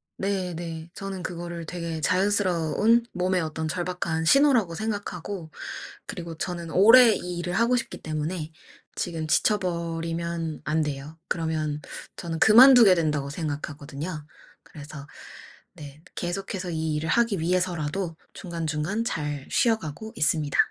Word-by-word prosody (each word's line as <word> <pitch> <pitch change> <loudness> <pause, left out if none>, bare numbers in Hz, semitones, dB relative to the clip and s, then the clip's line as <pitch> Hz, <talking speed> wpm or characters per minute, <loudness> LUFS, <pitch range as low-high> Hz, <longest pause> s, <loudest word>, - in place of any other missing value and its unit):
네, 190 -2 -2
네. 165 -1 -6
저는 195 -2 -5
그거를 170 -1 -5
되게 165 -2 -4
자연스러운 195 +4 +2
몸의 180 0 +1
어떤 160 0 -3
절박한 175 -2 -2
신호라고 245 - +4
생각하고, 200 -4 -4 0.6
그리고 170 -2 -6
저는 170 -1 -5
오래 225 +4 +8
이 180 -2 -4
일을 175 +1 -3
하고 235 +4 +3
싶기 240 - -3
때문에 155 +1 -3 0.4
지금 165 -3 -3
지쳐 210 +6 +3
버리면 170 -2 -3
안 155 +1 +1
돼요. 150 +1 -4
그러면 155 -3 -1 0.3
저는 165 -1 -5
'그만두게 230 -2 +8
된다.'고 150 -4 0
생각하거든요. 150 +1 -5 0.4
그래서 145 -1 -10 0.7
네. 145 0 -11
계속해서 180 0 -4
이 160 -1 -1
일을 160 +2 -2
하기 230 -5 +2
위해서라도 175 0 -1 0.2
중간중간 170 +3 -3
잘 150 - -3
쉬어 225 -2 +3
가고 190 +6 -8
있습니다. 150 -1 +1
170 Hz, 305 characters per minute, -26 LUFS, 155-190 Hz, 0.7 s, 오래